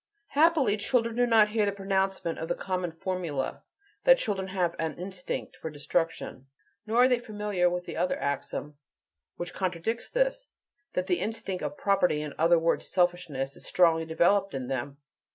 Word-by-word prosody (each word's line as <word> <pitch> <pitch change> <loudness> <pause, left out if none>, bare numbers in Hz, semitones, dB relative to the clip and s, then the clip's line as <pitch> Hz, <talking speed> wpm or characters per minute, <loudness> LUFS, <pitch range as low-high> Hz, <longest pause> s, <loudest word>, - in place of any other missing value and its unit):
Happily, 290 -8 +4
children 230 +1 +1
do 245 0 +3
not 220 -2 +5
hear 210 -1 +1
the - - +2
pronouncement 195 -3 -1
of 160 - -4
the - - 0
common 185 -2 -2
formula, 165 -5 -3 0.4
that - - +7
children 195 - -2
have 180 -3 -1
an 160 -1 -2
"instinct" 180 0 -5
for 160 - -5
destruction. 150 -2 -2 0.4
Nor 230 +3 +4
are - - +7
they 250 -2 +2
familiar 210 -5 0
with 180 0 -3
the - - -6
other 180 - +1
axiom 140 +1 -3 0.6
which 175 0 -5
contradicts 185 +5 -2
this: - - 0 0.5
That 180 - 0
the 180 -2 +1
instinct 195 -2 -3
of 295 - -4
"property," 180 -6 +2
in 150 - -6
other 170 +2 +5
words, 165 0 +1
selfishness, 175 -7 0
is - - -13
strongly 165 -2 +3
developed 185 +3 +2
in 130 -1 -4
them. 135 +2 -3
185 Hz, 170 wpm, -28 LUFS, 165-210 Hz, 0.6 s, that